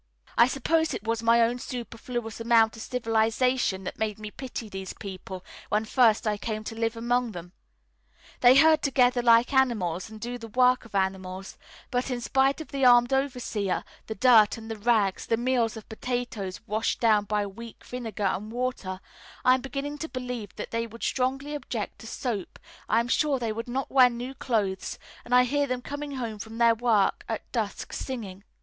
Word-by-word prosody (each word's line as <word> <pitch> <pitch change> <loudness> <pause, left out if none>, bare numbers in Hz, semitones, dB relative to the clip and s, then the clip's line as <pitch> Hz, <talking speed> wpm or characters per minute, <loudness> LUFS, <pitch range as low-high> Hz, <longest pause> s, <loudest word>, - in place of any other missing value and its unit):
I 235 - +6
suppose 320 +4 +1
it - - -6
was 225 0 0
my 230 +1 +4
own 235 +2 +2
superfluous 235 -2 -5
amount 230 -1 +4
of 225 - -9
civilisation 225 -3 +1
that - - -6
made 215 -2 -1
me 215 -1 -7
pity 250 -3 -6
these 190 -2 -6
people 190 -2 -8 0.2
when 215 +1 +1
first 230 -2 +3
I 210 -1 +1
came 215 -1 -3
to 225 - -6
live 225 0 -1
among 240 0 0
them. 175 0 -8 0.9
They 250 +1 +7
herd 315 +2 +6
together 250 -2 +3
like 235 +1 +5
animals 215 -9 +1
and 220 0 -10
do 245 +2 -5
the 230 - -8
work 250 +2 +3
of 220 - -11
animals; 190 0 -2 0.4
but 250 +2 0
in 250 -2 -2
spite 265 +4 +2
of 315 - -8
the 275 -2 -2
armed 245 0 +6
overseer, 250 -7 -1 0.2
the 220 - -4
dirt 230 -5 +5
and 225 0 -8
the - - -3
rags, 210 -3 +1
the 230 - +2
meals 240 -2 +1
of 220 - -10
potatoes 230 -5 -4
washed 220 0 -1
down 215 -3 +3
by 210 0 0
weak 230 +3 -10
vinegar 225 -4 -5
and 200 +3 -1
water, 235 -6 -3 0.4
I 255 - +7
am 260 - +1
beginning 280 +2 -5
to 320 - -4
believe 250 -6 -5
that - - -6
they 230 0 -1
would 230 +1 -11
strongly 270 +3 -1
object 295 - -5
to - - -10
soap, 220 -9 -4 0.3
I 225 - +4
am 235 - -4
sure 285 +3 +2
they 230 -3 -2
would 230 +2 -5
not 260 +2 -3
wear 255 -2 +7
new 245 +2 -6
clothes, 205 -8 -2 0.3
and 250 - +1
I 250 - +7
hear 285 +3 0
them 250 -1 -3
coming 285 0 -5
home 230 -5 -4
from 220 +2 -8
their 235 -1 +5
work 225 -3 +2
at - - -5
dusk - - -3
singing. 205 -7 -6
235 Hz, 190 wpm, -27 LUFS, 215-255 Hz, 0.9 s, They